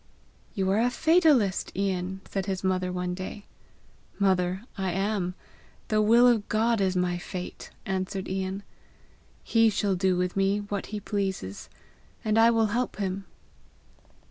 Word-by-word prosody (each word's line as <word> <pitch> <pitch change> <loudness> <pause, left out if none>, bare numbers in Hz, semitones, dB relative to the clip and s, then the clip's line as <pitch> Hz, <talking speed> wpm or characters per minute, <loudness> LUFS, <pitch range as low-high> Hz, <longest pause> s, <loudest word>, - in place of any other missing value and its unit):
"You 190 -2 0
are 200 - +3
a 240 +2 +3
fatalist, 295 - +3
Ian!" 190 -1 -2
said 195 -1 -3
his 190 -1 -2
mother 185 -1 0
one 180 0 -2
day. 190 +2 -7 0.7
"Mother, 185 -1 +1
I 190 -2 -2
am; 195 -1 -1 0.5
the 215 -1 +3
will 230 +3 +6
of 235 -4 +3
God 225 0 +2
is 190 -1 +1
my 180 -1 0
fate!" 180 0 -7 0.2
answered 190 0 -3
Ian. 190 +1 -3 0.8
"He 225 -1 +4
shall 205 -1 0
do 185 0 +1
with 180 0 -1
me 195 +1 +2
what 205 -1 -4
he 210 - -4
pleases; 195 - -3 0.6
and 215 +1 +3
I 230 +1 +7
will 225 -1 +3
help 245 +1 -1
him!" 195 -1 -3
195 Hz, 145 wpm, -27 LUFS, 185-215 Hz, 0.8 s, I